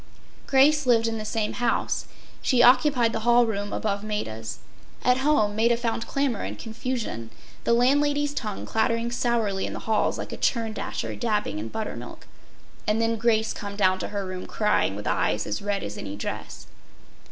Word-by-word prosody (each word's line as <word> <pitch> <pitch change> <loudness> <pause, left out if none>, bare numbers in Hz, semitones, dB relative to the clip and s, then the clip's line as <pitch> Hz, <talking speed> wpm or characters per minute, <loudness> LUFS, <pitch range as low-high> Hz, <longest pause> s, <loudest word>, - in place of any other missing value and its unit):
Grace 280 +1 +4
lived 230 -2 +4
in 225 -1 -2
the - - -4
same 215 0 -1
house. 240 -1 0 0.3
She 245 -2 +4
occupied 250 -2 +5
the - - -1
hall 240 +2 +5
room 205 -2 -3
above 205 -1 -2
Maida’s. 110 - -4 0.5
At 250 0 +4
home 240 -8 +2
Maida 230 +2 +3
found 230 -1 -2
clamor 275 -6 0
and - - -4
confusion. 225 - -4 0.4
The 235 - +3
landlady’s 290 +4 +3
tongue 215 -7 -4
clattering 230 +1 0
sourly 230 -5 0
in - - -5
the - - -6
halls 220 -1 +1
like - - -6
a - - -5
churn 225 -3 0
dasher - - -4
dabbing 210 - -1
in 110 - -4
buttermilk. 220 - -6 0.6
And 210 +1 +2
then 230 0 +2
Grace 220 -1 +2
come 200 -1 -6
down 185 -2 +3
to - - -3
her 200 -1 -3
room 185 -1 -6
crying 210 - +1
with 105 0 -7
eyes 105 - +1
as 105 - -3
red 200 -1 -1
as 105 - -6
any 100 -1 -5
dress. 100 - -6
225 Hz, 175 wpm, -25 LUFS, 205-240 Hz, 0.6 s, occupied